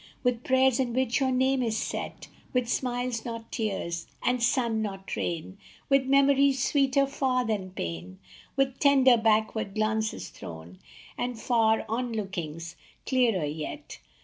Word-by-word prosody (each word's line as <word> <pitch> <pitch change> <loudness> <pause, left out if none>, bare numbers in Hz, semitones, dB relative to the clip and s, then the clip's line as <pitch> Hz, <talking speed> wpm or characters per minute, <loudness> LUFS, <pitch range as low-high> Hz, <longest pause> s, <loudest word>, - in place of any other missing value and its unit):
With 245 -2 0
prayers 260 -1 +3
in 245 -3 0
which 255 -1 +1
your 265 -1 +2
name 260 +1 +2
is 225 -3 0
set; - - -4 0.3
With 250 -2 +1
smiles, 245 -1 -1
not 230 -1 -7
tears; 195 -7 -3 0.2
and 250 -1 +1
sun, 235 -2 +2
not 195 -2 -4
rain; 175 +3 -4 0.3
With 275 -1 +3
memories 275 -1 +4
sweeter 275 -1 +3
far 260 -2 0
than 205 -4 -2
pain, 90 - -6 0.4
With 270 -1 0
tender 270 -3 +6
backward 220 -2 +1
glances 215 0 -1
thrown, 85 +2 -10 0.4
And 245 -2 -2
far 225 -2 +2
on 235 +2 -2
lookings, 170 -5 -5 0.3
clearer 235 - +2
yet. 155 - -6
235 Hz, 140 wpm, -28 LUFS, 205-260 Hz, 0.4 s, tender